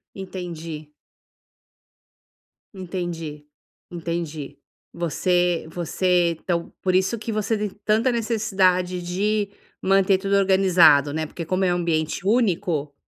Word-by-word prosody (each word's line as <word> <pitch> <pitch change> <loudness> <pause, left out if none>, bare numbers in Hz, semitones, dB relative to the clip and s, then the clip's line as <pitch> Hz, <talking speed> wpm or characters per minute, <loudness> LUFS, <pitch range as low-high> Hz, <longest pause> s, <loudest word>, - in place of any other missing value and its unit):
Entendi. 170 -5 -7 1.8
Entendi, 170 -5 -5 0.4
entendi. 165 -4 -5 0.4
Você 175 +1 0
você 175 0 +1
então, 170 -2 -2
por 185 -1 0
isso, 190 +5 +2
que 225 - -5
você 215 +1 0
tem 210 0 -1 0.2
tanta 220 +4 +3
necessidade 190 -6 +1
de 200 +4 -1 0.3
manter 195 0 +4
tudo 195 0 -1
organizado, 180 -7 +5
né? 155 0 -2
Porque 170 +2 -7
como 185 +3 0
é 180 - +2
um - - -1
ambiente 165 +1 -1
único 175 - +1
180 Hz, 110 wpm, -23 LUFS, 165-195 Hz, 1.8 s, organizado